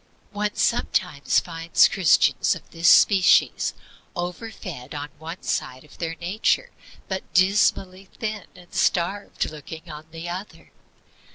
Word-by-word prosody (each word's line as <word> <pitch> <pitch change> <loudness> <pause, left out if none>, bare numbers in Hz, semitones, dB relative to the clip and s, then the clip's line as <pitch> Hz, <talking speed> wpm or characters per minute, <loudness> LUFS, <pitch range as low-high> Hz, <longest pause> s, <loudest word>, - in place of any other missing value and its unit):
One 210 0 -2
sometimes 180 -10 +1
finds 165 -1 +2
Christians 185 -5 +3
of - - -12
this 165 0 +3
species 195 -3 +5 0.4
over 180 +5 -4
fed 155 - -8
on 145 0 -5
one 165 +3 -8
side 130 0 -3
of 150 - -18
their 165 -1 -3
nature, 210 - 0 0.4
but 190 -1 -5
dismally 190 0 +2
thin 215 -3 -4
and 175 -1 -17
starved 190 +4 0
looking 160 +2 -10
on 150 +1 -10
the 165 +1 -8
other. 185 +4 -8
175 Hz, 125 wpm, -24 LUFS, 165-195 Hz, 0.4 s, species